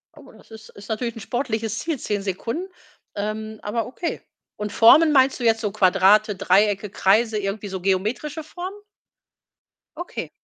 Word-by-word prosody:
Oh, - - -15
das - - -20
ist 220 0 -12
ist 200 - -13
natürlich 230 +1 -3
'n - - -8
sportliches 225 -2 -3
Ziel, 320 -1 -3
10 205 -2 -2
Sekunden. 230 - -4 0.5
Ähm, 215 +1 -4
aber 220 +2 -2
okay, 280 +7 -5 0.3
und 210 0 -5
Formen 305 +10 +6
meinst 270 -2 +3
du - - -5
jetzt 225 -1 +3
so 210 -3 -2
Quadrate, 200 +1 +4
Dreiecke, 200 +2 +2
Kreise, 215 +3 +2
irgendwie 205 +1 -3
so 190 -2 -6
geometrische 220 - -1
Formen? 360 +5 -7 1.2
Okay. 350 - -6
220 Hz, 155 wpm, -23 LUFS, 205-245 Hz, 1.2 s, Formen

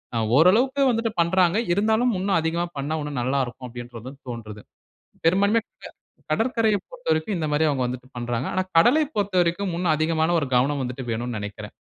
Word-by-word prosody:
அ - - +1 0.2
ஓரளவுக்கு 240 - +4
வந்துட்டு 230 -1 -1
பண்ராங்க. 180 +2 +3 0.2
இருந்தாலும் 220 +5 +2
இன்னும் 195 -2 +1
அதிகமா 165 +2 -1
பண்ணா, 145 +3 -2
இன்னும் 145 -3 -4
நல்லாருக்கும் 130 0 -2
அப்டின்றது 120 0 -9 0.2
தோண்றது. 110 -3 -7 0.6
பெரும்பான்மைய 200 +6 +3 0.2
க - - -9 0.4
கடற்கரையை 225 -3 +1
பொறுத்தவரைக்கும், 185 -6 -1
இந்த 155 -2 -2
மாரி 155 +2 +3
அவுங்க 130 -3 0
வந்துட்டு 125 +1 -7
பண்றாங்க. 120 +1 -2
"ஆனா 185 - +1
கடலை 250 - +5
பொறுத்தவரைக்கும் 185 -2 0
இன்னும் 170 -3 +2
அதிகமான 160 +1 +1
ஒரு 145 - -3
கவனம் 135 +3 +2
வந்துட்டு 125 +1 -5
வேணுன்னு 120 0 -3
நினைக்கிறேன்." 105 0 -7
160 Hz, 155 wpm, -24 LUFS, 130-200 Hz, 0.6 s, கடலை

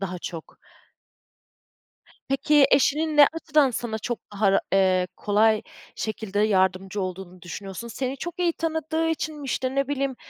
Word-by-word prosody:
daha 185 -2 -4
çok? 165 -2 -8 1.7
Peki, 275 +1 +4
eşinin 300 +3 +2
ne 290 -1 +9
açıdan 305 -4 +2
sana 225 -2 -3
çok 240 +2 -3
daha, 200 -1 +2
eee, 185 -1 +3
kolay 215 +1 +2 0.3
şekilde 215 -2 -3
yardımcı 190 -1 +1
olduğunu 185 -1 -6
düşünüyorsun? 195 +6 -7
Seni 260 +3 -3
çok 345 +5 -7
iyi 345 -2 +2
tanıdığı 320 0 -1
için 310 -2 -3
mi? - - -8
İşte 260 0 -2
ne 275 0 0
bileyim, 275 -2 -1
235 Hz, 140 wpm, -25 LUFS, 195-295 Hz, 1.7 s, ne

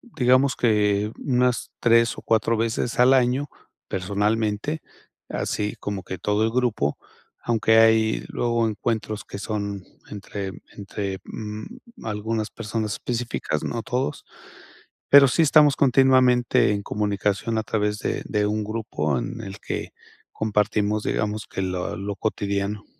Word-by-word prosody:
digamos 130 +1 +3
que 105 -2 +2
unas 125 -2 0
3 115 0 +3
o - - -7
4 115 0 +1
veces 115 +2 -1
al 125 +2 +6
año, 130 +2 +2 0.4
personalmente, 105 - -1 0.5
así 105 0 -2
como 100 -2 -4
que 95 - -6
todo 105 +4 +1
el 110 - +1
grupo, 115 - 0 0.4
aunque 110 -1 +2
hay 110 -1 +4
luego 120 -1 0
encuentros 110 0 -2
que - - -8
son 100 -2 -4 0.3
entre 100 -1 -6 0.3
entre, 100 -1 -4
mm, 155 - -9
algunas 110 0 -2
personas 110 -1 -3
específicas, 115 -10 -3
no 115 - -3
todos, 125 - -2 0.8
pero 140 -1 +9
sí 135 - +2
estamos 150 -1 +5
continuamente 130 -4 +4
en 100 0 -3
comunicación 105 +2 -1
a - - -2
través 105 -1 -1
de - - -2
de 105 -1 0
un 105 +1 -1
grupo 105 - -2
en 85 - -5
el 100 -1 -8
que - - -5 0.4
compartimos, 105 0 0
digamos, 105 0 -2
que - - -4
lo 90 -1 -2
lo 100 +1 -4
cotidiano. 100 0 -2
110 Hz, 135 wpm, -24 LUFS, 105-120 Hz, 0.8 s, pero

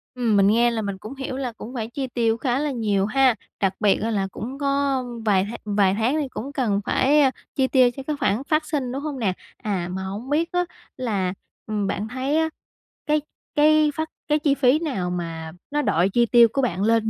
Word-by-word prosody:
Ừm, 235 -4 +1
mình 195 - +5
nghe 235 +3 +4
là 225 -1 -2
mình 200 -2 -3
cũng 215 +8 -9
hiểu 265 -1 -5
là 255 -3 -2
cũng 230 +3 -9
phải 225 -3 -3
chi 265 +1 -3
tiêu 230 -2 +1
khá 250 +2 0
là 295 -1 -1
nhiều 205 -5 +1
ha. 260 +1 +3 0.2
Đặc 195 -1 +1
biệt 205 -2 +3
á 225 - -1
là 195 -2 0
cũng 260 +5 -6
có 275 -2 +1 0.2
vài 195 -2 +3
th - - -7
vài 200 -2 +3
tháng 235 +6 +1
thì 280 - -2
cũng 260 +2 -6
cần 210 -7 0
phải, 290 +3 +3
a, 265 -2 +4 0.2
chi 265 -2 +2
tiêu 255 -2 +5
cho 270 - -5
cái 300 - 0
khoản 210 +6 +1
phát 310 0 +2
sinh, 280 -5 -2
đúng 275 +2 -3
hông 290 -3 -4
nè? 195 -6 +1 0.2
À, 185 -5 -2
mà 190 +1 -4
hổng 205 +7 -6
biết 325 +3 +1
á 355 0 +1 0.3
là, 200 -7 -1 0.3
ừm, 210 -2 -1
bạn 205 +2 -2
thấy 260 +6 -1
á 320 0 +2 0.6
cái 300 -1 +2 0.3
cái 305 0 +5
phát 315 0 -2 0.2
cái 300 0 +2
chi 290 -2 +2
phí 275 +2 +4
nào 245 - -2
mà 165 -2 -4 0.2
nó 295 0 +1
đội 175 - +2
chi 240 +4 +3
tiêu 235 0 +6
của 275 - +1
bạn 195 -6 0
lên 225 0 +3
240 Hz, 230 wpm, -23 LUFS, 205-275 Hz, 0.6 s, tiêu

